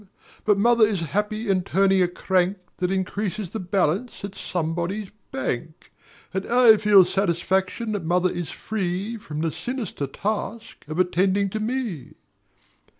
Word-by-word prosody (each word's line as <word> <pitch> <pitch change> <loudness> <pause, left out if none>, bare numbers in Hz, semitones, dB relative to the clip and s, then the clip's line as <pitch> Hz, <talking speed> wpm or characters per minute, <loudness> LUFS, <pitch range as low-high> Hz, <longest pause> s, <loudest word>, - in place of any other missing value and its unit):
But 210 -2 +4
mother 235 +2 +4
is 210 -5 +2
happy 215 +2 -1
in 190 -2 +2
turning 195 +1 +3
a 180 - +4
crank 185 +2 0 0.2
That 180 - 0
increases 195 0 -2
the 220 - -4
balance 190 +4 -1
at 200 - -8
somebody's 175 +4 -3 0.2
bank; 145 +5 -4 0.4
And 190 0 -1
I 240 -2 +7
feel 205 -3 +6
satisfaction 190 +4 0
that 205 -4 -2
mother 180 +2 +2
is 175 -5 -4
free 200 +1 -3
From 155 -7 -6
the 165 -1 0
sinister 240 - -4
task 215 +4 -4
of 155 +2 -5
attending 190 +2 +2
to 215 - -2
me. 220 - -3
195 Hz, 145 wpm, -24 LUFS, 180-215 Hz, 0.4 s, I